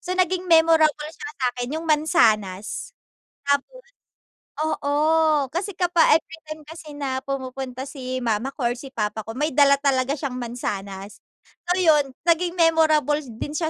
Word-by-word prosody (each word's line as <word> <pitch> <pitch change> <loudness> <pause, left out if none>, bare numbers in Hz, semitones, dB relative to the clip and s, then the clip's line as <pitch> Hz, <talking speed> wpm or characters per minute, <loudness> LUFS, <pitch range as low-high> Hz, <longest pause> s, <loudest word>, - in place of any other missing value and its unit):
So 365 +1 -4
naging 370 0 0
memorable 320 -2 +4
siya 440 +5 -8
sa'kin 250 +2 -2
yung 320 - -5
mansanas, 225 - +1 0.5
apple. 285 - 0 0.8
Oo 310 0 +2
kasi 370 +5 -3
kapa 355 -2 +2
every 325 0 -3
time 310 0 -7
kasi 320 -1 -10
na 265 -2 -2
pumupunta 260 -1 -5
si 255 -2 -5
mama 230 +3 -1
ko 240 -4 0
or - - -3
si 270 0 -10
papa 215 -1 -2
ko - - -4
may 300 +3 0
dala 280 -1 +6
talaga 270 -2 +1
siyang 270 -3 -4
mansanas. 200 -5 -5 0.5
So, 355 - +2
yun 300 -6 +3 0.2
naging 345 +1 +2
memorable 315 -3 +3
din 260 +2 -7
siya 320 0 -1
290 Hz, 150 wpm, -23 LUFS, 255-320 Hz, 0.8 s, dala